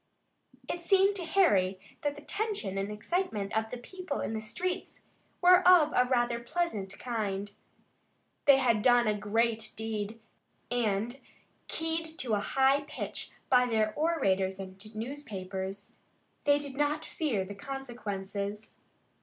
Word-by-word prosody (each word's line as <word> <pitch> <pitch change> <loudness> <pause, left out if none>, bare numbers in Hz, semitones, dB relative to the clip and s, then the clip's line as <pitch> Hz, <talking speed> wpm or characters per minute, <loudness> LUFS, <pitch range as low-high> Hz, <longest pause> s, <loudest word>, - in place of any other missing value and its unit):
It 345 - -4
seemed 390 +2 +4
to 350 - -4
Harry 200 - +3 0.2
that 290 -1 -1
the 290 - -11
tension 410 - -2
and 195 +2 -2
excitement 210 - -2
of 220 0 0
the 250 - -5
people 360 +4 -5
in - - -2
the 220 - -2
streets 360 +12 -4 0.4
were 360 0 +8
of 355 -4 +6
a 250 0 +3
rather 240 -2 +2
pleasant 235 - -2
kind. 205 -4 -3 0.9
They 280 -2 +8
had 235 -5 +3
done 245 +1 +5
a 215 - +3
great 220 +2 0
deed, 220 0 -4 0.5
and, 235 +1 0 0.5
keyed 325 0 -2
to 240 -4 -1
a 205 - +3
high 270 +6 +3
pitch 305 - -5 0.2
by 250 -1 +5
their 220 -2 +1
orators 195 - +1
and 190 0 -8
newspapers, 200 -6 -5 0.5
they 285 0 +5
did 285 -2 -6
not 295 +2 0
fear 230 -12 -1
the 205 - -7
consequences. 205 -4 -5
235 Hz, 135 wpm, -30 LUFS, 205-295 Hz, 0.9 s, were